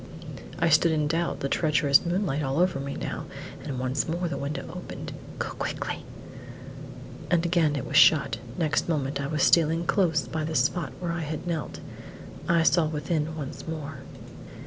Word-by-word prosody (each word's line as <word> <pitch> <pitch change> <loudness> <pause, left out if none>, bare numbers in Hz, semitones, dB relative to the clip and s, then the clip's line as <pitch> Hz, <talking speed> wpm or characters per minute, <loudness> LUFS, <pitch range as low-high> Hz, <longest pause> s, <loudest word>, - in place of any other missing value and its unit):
I 165 - +2
stood 165 +2 +5
in 155 -1 +1
doubt, 165 +3 -1
the 140 - 0
treacherous 150 -2 +3
moonlight 175 -4 0
all 135 0 -1
over 180 -4 +2
me 140 0 -4
now, - - -4 0.4
and 135 - -4
once 130 +4 -1
more 175 +2 -1
the 170 - -3
window 140 0 -3
opened. - - -7 0.2
"Go - - -2
quickly!" - - -4 1.3
And 175 -1 +2
again 165 -4 +2
it 135 - -3
was 145 - 0
shut; 140 -7 +6 0.2
next 160 0 0
moment 140 -3 -1
I 140 - -2
was 150 -1 0
stealing 165 0 +4
close 160 - +2
by 155 +5 -3
the 160 +1 -3
spot 135 +3 +1
where 175 -2 -2
I 170 0 -2
had 155 +1 -4
knelt. 160 -7 -3 0.7
I 170 -1 +4
saw 160 +1 +4
within 155 0 -2
once 140 +1 -6
more. 155 -3 -5
155 Hz, 170 wpm, -27 LUFS, 140-170 Hz, 1.3 s, shut